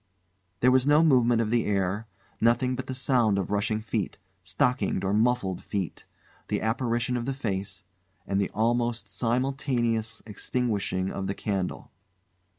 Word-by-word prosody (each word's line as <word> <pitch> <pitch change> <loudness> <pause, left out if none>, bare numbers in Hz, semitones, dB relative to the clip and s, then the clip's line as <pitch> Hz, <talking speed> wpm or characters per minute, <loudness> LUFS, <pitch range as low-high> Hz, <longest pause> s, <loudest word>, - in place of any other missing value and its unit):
There 125 - +5
was 130 +1 +3
no 150 +2 +6
movement 120 -6 +4
of 110 -1 -1
the 120 -1 +2
air; 100 +2 0 0.3
nothing 120 +2 +3
but 130 +1 -5
the 130 - -4
sound 120 -6 +2
of 100 0 -2
rushing 105 +1 0
feet 110 -3 -2 0.2
stockinged 95 +3 0
or 95 +1 0
muffled 110 -4 +1
feet; 95 -5 -4 0.4
the - - 0
apparition 120 +1 0
of 120 - -3
the 135 0 -2
face; 100 -5 -4 0.4
and 100 0 0
the 100 - 0
almost 120 0 0
simultaneous 120 0 -1
extinguishing 105 -4 -1
of 95 -1 -3
the 100 - -2
candle. 95 -3 -3
115 Hz, 150 wpm, -27 LUFS, 100-125 Hz, 0.4 s, no